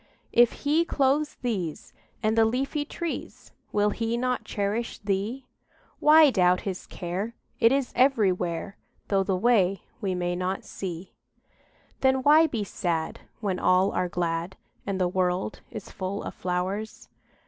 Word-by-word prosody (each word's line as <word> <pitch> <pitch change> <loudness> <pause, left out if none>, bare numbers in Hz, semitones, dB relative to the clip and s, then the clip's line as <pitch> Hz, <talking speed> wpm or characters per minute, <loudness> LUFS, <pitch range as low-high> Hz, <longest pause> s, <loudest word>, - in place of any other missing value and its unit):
If 240 0 +4
He 305 +4 +4
clothes 290 -1 +1
these 190 -10 -3 0.3
And 215 +1 +2
the 225 - +5
leafy 270 +6 0
trees, 335 +2 -6 0.2
Will 205 0 +2
He 230 +1 -1
not 250 +1 -1
cherish 210 +3 -2
thee? 205 +6 -2 0.5
Why 305 -1 +7
doubt 180 -4 +3
His 190 -2 -5
care; 190 +6 -4 0.2
It 230 0 +5
is 270 -2 0
everywhere, 195 -9 +1 0.3
Though 195 -1 +3
the 190 0 0
way 195 -3 +2 0.2
we 190 -3 -1
may 175 0 -1
not 185 +2 -2
see. 180 -1 -6 0.9
Then 265 0 +2
why 310 +3 +6
be 230 -8 -2
sad 170 -4 -2 0.2
When 195 -4 -1
all 185 +2 +3
are 180 - -1
glad, 170 +1 -2 0.3
And 195 -1 -1
the 180 - +2
world 180 +2 -1
is 210 - -8
full 190 +2 -4
of - - -6
flowers? 185 +4 -3
200 Hz, 145 wpm, -26 LUFS, 180-245 Hz, 0.9 s, Why